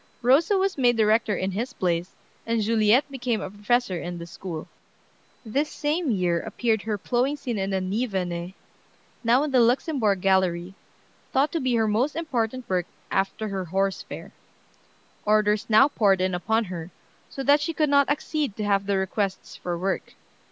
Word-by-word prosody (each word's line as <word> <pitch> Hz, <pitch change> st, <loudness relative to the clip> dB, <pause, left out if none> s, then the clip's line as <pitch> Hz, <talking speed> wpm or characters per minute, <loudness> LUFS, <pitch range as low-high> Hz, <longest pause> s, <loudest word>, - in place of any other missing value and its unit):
Rosa 295 Hz, -, +4 dB
was 385 Hz, -4 st, 0 dB
made 240 Hz, -2 st, +4 dB
director 220 Hz, 0 st, +3 dB
in 190 Hz, +2 st, -2 dB
his 235 Hz, +7 st, -3 dB
place, 175 Hz, 0 st, -1 dB, 0.3 s
and 230 Hz, -1 st, 0 dB
Juliette 225 Hz, +5 st, +3 dB
became 245 Hz, -4 st, -1 dB
a 190 Hz, -, -6 dB
professor 205 Hz, -2 st, 0 dB
in 175 Hz, +1 st, -5 dB
the 170 Hz, -, -7 dB
school. 170 Hz, -1 st, -7 dB, 0.8 s
This 280 Hz, +7 st, 0 dB
same 305 Hz, +1 st, -1 dB
year 180 Hz, -6 st, +1 dB
appeared 225 Hz, +1 st, -1 dB
her 215 Hz, -1 st, -2 dB
"Plowing 250 Hz, +7 st, 0 dB
Scene 240 Hz, -6 st, -3 dB
in 195 Hz, 0 st, -1 dB
the 190 Hz, -1 st, 0 dB
Nivernais," 185 Hz, -3 st, -2 dB, 0.7 s
now 240 Hz, +4 st, +4 dB
in 300 Hz, -, -2 dB
the 260 Hz, -, +4 dB
Luxembourg 235 Hz, -, +2 dB
Gallery, 185 Hz, -1 st, +1 dB, 0.6 s
thought 280 Hz, +3 st, +2 dB
to 330 Hz, -, -1 dB
be 255 Hz, -4 st, 0 dB
her 225 Hz, -1 st, +2 dB
most 235 Hz, +8 st, +1 dB
important 255 Hz, -6 st, -2 dB
work 180 Hz, -2 st, 0 dB, 0.2 s
after 210 Hz, +2 st, -1 dB
her 190 Hz, -2 st, -3 dB
"Horse 195 Hz, +3 st, 0 dB
Fair." -, -, -9 dB, 0.9 s
Orders 210 Hz, 0 st, +2 dB
now 225 Hz, +6 st, +7 dB
poured 205 Hz, -9 st, +2 dB
in 185 Hz, 0 st, 0 dB
upon 220 Hz, +6 st, +1 dB
her, 175 Hz, -4 st, -6 dB, 0.4 s
so 270 Hz, -, -5 dB
that 285 Hz, +2 st, +5 dB
she 325 Hz, +3 st, -1 dB
could 310 Hz, -1 st, +1 dB
not 280 Hz, -1 st, +4 dB
accede 290 Hz, -4 st, -1 dB
to 215 Hz, -, -2 dB
half 200 Hz, -1 st, +1 dB
the 200 Hz, -1 st, +1 dB
requests 190 Hz, +1 st, -2 dB
for 175 Hz, -1 st, -4 dB
work. 190 Hz, +2 st, -3 dB
215 Hz, 175 wpm, -25 LUFS, 190-255 Hz, 0.9 s, now